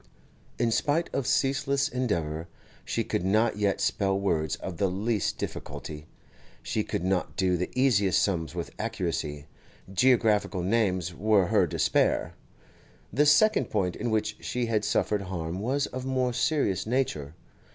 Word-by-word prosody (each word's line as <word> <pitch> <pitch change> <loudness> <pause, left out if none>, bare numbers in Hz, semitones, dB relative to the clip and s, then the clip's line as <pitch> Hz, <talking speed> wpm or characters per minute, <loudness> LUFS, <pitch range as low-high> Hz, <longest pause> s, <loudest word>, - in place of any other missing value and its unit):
In 115 -1 +1
spite 145 +9 0
of 135 - -1
ceaseless 140 +1 +1
endeavour, 85 - -2 0.4
she - - -1
could - - -2
not 110 +3 +2
yet 100 -2 +1
spell 95 -1 +1
words 80 -6 0
of 90 -3 -7
the 100 +1 +1
least 105 +2 -1
difficulty; 75 0 -6 0.6
she - - -1
could - - -3
not 95 -1 -1
do 95 -1 +2
the 90 +1 -2
easiest 110 -8 +3
sums 85 -4 -1
with 85 -2 -4
accuracy; 85 -9 -3 0.5
geographical 105 -4 +3
names 95 -4 +1
were 105 +1 +3
her - - +3
despair. - - +1 0.8
The 145 +3 +3
second 215 +9 +5
point 95 -4 0
in 120 - -3
which 110 -1 -1
she 125 -1 -1
had 110 -2 0
suffered 105 0 +1
harm 90 -2 -4
was 135 +7 0
of 130 0 -6
more 130 -1 0
serious 120 - 0
nature. 85 - -1
105 Hz, 145 wpm, -27 LUFS, 90-125 Hz, 0.8 s, second